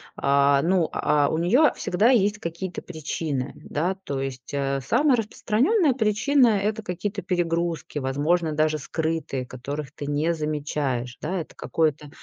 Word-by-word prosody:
а, 140 0 +3
ну, 175 -1 +2
а, 145 -1 +2
у 160 - -1
неё 245 - +4
всегда 210 +7 +2
есть 210 -4 +3
какие-то 170 +2 -5
причины, 150 -4 -4
да? 170 +6 -2
То 140 -1 -3
есть, 135 -2 -5
э, 140 -1 -1
самая 275 - +3
распространённая 255 - +2
причина- 245 +4 +3 0.2
это 215 +1 -1
какие-то 200 +2 -4
перегрузки, 170 -4 -1
возможно, 150 +5 0
даже 155 0 +1
скрытые, 160 -3 -2
которых 135 +3 -6
ты 145 0 -7
не 150 +3 +1
замечаешь, 145 -5 -2
да? 185 0 -2
Это - - -11
какой-то 150 -2 -1
160 Hz, 140 wpm, -25 LUFS, 140-195 Hz, 0.2 s, неё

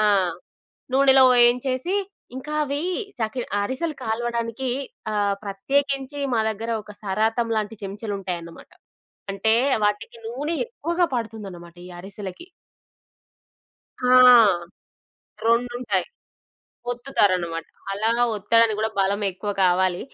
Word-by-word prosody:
ఆ! - - +3 0.9
నూనెలో 270 -1 +6
వేయించేసి, 255 +8 +3 0.4
ఇంకా 300 +3 -6
అవి 285 +2 -2 0.4
చకి 220 +3 -2
ఆహ్, 205 - +1
అరిసెలు 290 +7 -3
కాల్వడానికి 235 +2 -2 0.4
ఆహ్, 205 -1 +1
ప్రత్యేకించి 275 +7 -1
మా 225 - +2
దగ్గర 220 +2 -5
ఒక 210 - -11
సరాతం 220 +4 0
లాంటి 215 0 -3
చెంచలుంటాయన్నమాట. 195 -4 -6 0.6
అంటే 220 +3 +2 0.3
వాటికి 210 +3 -2
నూనె 280 +8 -3
ఎక్కువగా 345 -6 -1
పడుతుందన్నమాట. 200 -8 -6
ఈ - - -11
అరిసెలకి. 195 - -9 1.6
ఆ! 250 - +2 1.4
రెండుంటాయి. 240 +1 +1 0.9
ఒత్తుతారన్నమాట. 185 -10 0 0.3
అలా 215 +3 0 0.3
ఒత్తడినికి 220 +1 +3
గూడా 220 +1 0
బలం 200 +2 +1
ఎక్కువ 200 +3 -5
కావాలి. 180 0 +2
225 Hz, 100 wpm, -23 LUFS, 200-255 Hz, 1.6 s, నూనెలో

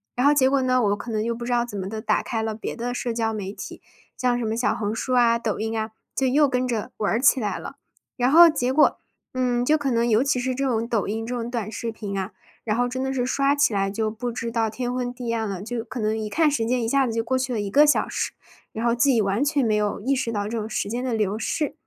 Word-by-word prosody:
然 250 +3 +3
后 295 - +5
结 260 -2 +4
果 270 0 +2
呢， 255 -1 +2
我 205 - +2
又 - - +2
可 220 +3 -8
能 215 -1 0
又 235 +1 -1
不 235 +1 -7
知 245 - -3
道 240 -1 +2
怎 210 -4 -6
么 190 0 -4
地 220 0 -5
打 - - +1
开 225 -3 -3
了 220 -1 -2
别 215 - -5
的 245 +1 -3
社 245 -1 -2
交 225 -1 -1
媒 200 -3 -4
体， - - -9 0.3
像 250 -1 +1
什 240 - -2
么 220 - -1
小 240 +3 +1
红 210 -1 -2
书 255 +3 -1
啊、 235 -1 +4
抖 215 -3 -2
音 220 +1 -2
啊， 220 0 -3 0.3
就 265 - +1
又 290 +3 +4
跟 255 -1 0
着 230 -4 -3
玩 210 - 0
儿 230 - +1
起 270 0 +5
来 210 -4 -2
了。 - - -8 0.4
然 250 +1 +1
后 340 +3 +9
结 260 -6 +1
果， 300 +3 +4 0.3
嗯， 245 -1 0
就 305 +4 +4
可 280 -1 -1
能 235 -1 +1
尤 225 +1 +3
其 275 -2 +1
是 255 +1 -1
这 275 +2 -2
种 230 -3 0
抖 230 -4 0
音 225 +2 -3
这 250 - -4
种 235 -1 -3
短 225 -4 -3
视 230 +1 -4
频 205 -3 -6
啊， 195 +1 -3 0.3
然 215 0 -1
后 245 - +2
真 255 +1 -4
的 265 0 -1
是 250 -2 -1
刷 275 +2 +2
起 285 -6 +3
来 195 -1 +1
就 215 +2 -1
不 240 +2 -4
知 230 0 -4
道 225 -1 +1
天 245 +2 -3
昏 250 -1 -2
地 245 -2 -4
暗 220 -2 -1
了。 195 0 -5
就 235 0 -4
可 245 0 -7
能 215 0 0
一 215 -1 -3
看 310 +6 +3
时 230 -5 0
间 245 0 +1
一 - - -1
下 270 +2 +2
子 230 - -3
就 230 - 0
过 260 +3 -1
去 260 0 -1
了 230 - -1
1 205 -1 -3
个 295 +6 +6
小 295 - +3
时， - - -3 0.4
然 225 +2 -4
后 235 - +3
自 240 +4 +3
己 235 -5 +3
完 200 +6 +1
全 290 -3 +1
没 215 -1 +2
有 210 -1 0
意 265 +7 0
识 250 -3 -1
到 205 -2 -1
这 230 - -4
种 215 +1 -5
时 215 - -2
间 240 +4 -3
的 250 -3 -1
流 210 -1 0
逝。 295 +4 -1
235 Hz, 320 characters per minute, -24 LUFS, 220-255 Hz, 0.4 s, 后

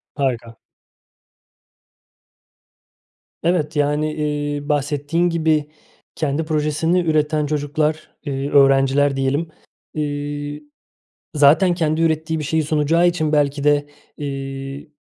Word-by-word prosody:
Harika. 120 -5 -2 2.9
Evet, 160 -3 0
yani, 150 +1 +1
eee, 145 -1 -3
bahsettiğin 150 +4 0
gibi 160 -3 +1 0.5
kendi 155 0 -1
projesini 155 +2 +1
üreten 155 -2 +1
çocuklar, 150 +1 -2
eee, 140 -1 -3
öğrenciler 135 0 +4
diyelim. 135 +5 -1 0.4
İii, 145 0 -4 0.7
zaten 150 +6 +5
kendi 160 -2 0
ürettiği 160 0 0
bir - - -4
şeyi 160 +2 0
sunacağı 155 +3 +2
için 160 -3 0
belki 145 -1 +1
de, 145 0 +2 0.3
iii, 135 +1 -6
150 Hz, 95 wpm, -20 LUFS, 145-155 Hz, 2.9 s, zaten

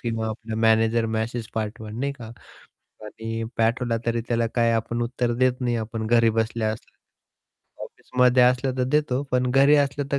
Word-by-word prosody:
किंवा 115 -2 -2
आपला 110 0 -6
manager 115 +1 +3
message 110 +1 -3
पाठवल 110 0 -4
नाही 140 +2 -1
का 125 -5 -11 0.8
आणि 115 +1 -5
पाठवला 115 +1 +1
तरी 115 0 0
त्याला 115 -1 +1
काय 115 -1 +2
आपण 115 +1 -1
उत्तर 120 0 -1
देत 130 0 +2
नाही 120 -2 0
आपण 110 0 -4
घरी 115 0 +4
बसल्या 110 0 -1
असल्या. 110 - -12 0.9
ऑफिसमध्ये 125 0 +1
असलं 125 +1 +2
तर 125 - +2
देतो 145 -2 +1
पण 125 0 +1
घरी 140 +3 +5
असलं 140 0 0
तर 140 - +2
120 Hz, 165 wpm, -24 LUFS, 115-125 Hz, 0.9 s, घरी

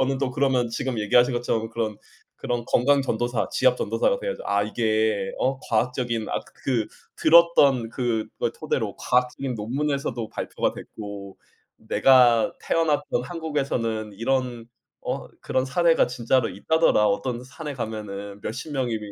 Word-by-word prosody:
저는 135 0 +1
또 135 -2 -1
그러면 130 -3 +1
지금 125 0 -3
얘기하신 120 +5 +4
것처럼 115 -2 -1
그런, 110 -2 -2 0.4
그런 120 -1 -3
건강 140 +4 +3
전도사 120 -1 -1
지압 - - +3
전도사가 - - 0
돼야죠. - - -4
아 100 0 +1
"이게 110 -2 0
어 135 0 0
과학적인 120 0 -1
아 - - -1 0.2
그 120 -5 +1 0.3
들었던 155 -7 +5
그 115 -3 -1
그걸 - - -2
토대로 - - -2
과학적인 125 +1 0
논문에서도 125 0 -2
발표가 - - -2
됐고 100 -2 -9 0.4
내가 120 +1 +4
태어났던 150 -6 0
한국에서는 135 -10 -2
이런 120 +1 -1 0.4
어 - - -4
그런 130 0 0
사례가 165 +5 +3
진짜로 125 0 +1
있다더라. 105 - +2
어떤 120 +4 -1
산에 145 +2 -7
가면은 100 -3 -6
몇십 130 +7 -5
명이" 125 -5 -1
125 Hz, 325 characters per minute, -24 LUFS, 110-135 Hz, 0.4 s, 들었던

